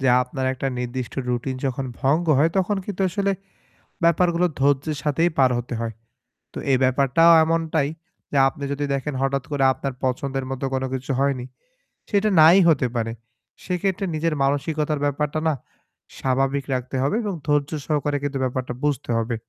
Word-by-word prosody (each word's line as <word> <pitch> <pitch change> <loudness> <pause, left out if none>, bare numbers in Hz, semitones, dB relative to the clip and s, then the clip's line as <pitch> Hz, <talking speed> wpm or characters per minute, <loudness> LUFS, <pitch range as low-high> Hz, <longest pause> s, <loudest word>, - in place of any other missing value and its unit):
যে 135 - +2
আপনার 130 +1 -4
একটা 130 +1 -4
নির্দিষ্ট 125 0 -4
রুটিন 125 +2 -2
যখন 135 +1 -2 0.2
ভঙ্গ 155 +6 +2
হয় 160 +3 +4
তখন 190 +2 +1
কিন্তু 195 -2 -3
আসলে 200 +2 0 0.7
ব্যাপারগুলো 170 +1 +3
ধৈর্যের 145 +2 +1
সাথেই 160 +4 +2
পার 130 -2 +5
হতে 120 +1 -5
হয়। 115 -1 -3 0.6
তো - - -7
এই 130 - +5
ব্যাপারটাও 135 +6 +4
এমনটাই, 160 -3 0 0.4
যে 145 - 0
আপনি 140 +1 -5
যদি 145 +1 -1
দেখেন 140 +2 -2
হঠাৎ 135 0 0
করে 140 -2 +1
আপনার 135 0 -4
পছন্দের 135 +1 -1
মতো 135 +1 -3
কোনো 130 0 -1
কিছু 130 +1 -3
হয়নি। 135 -3 0 0.6
সেটা 210 0 +2
নাই 165 +4 +8
হতে 135 -5 +3
পারে। 115 -1 -1 0.5
সেক্ষেত্রে 190 +2 -1
নিজের 160 0 0
মানসিকতার 150 +2 0
ব্যাপারটা 150 +2 -1
না 160 - +3 0.7
স্বাভাবিক 135 +1 0
রাখতে 130 +1 -4
হবে 140 - +1
এবং 205 -2 -2
ধৈর্য 145 -1 +2 0.2
সহকারে 145 -1 0
কিন্তু 145 -1 -2
ব্যাপারটা 130 -1 -2
বুঝতে 145 -5 -1
হবে। 115 +1 -1
140 Hz, 160 wpm, -23 LUFS, 130-160 Hz, 0.7 s, নাই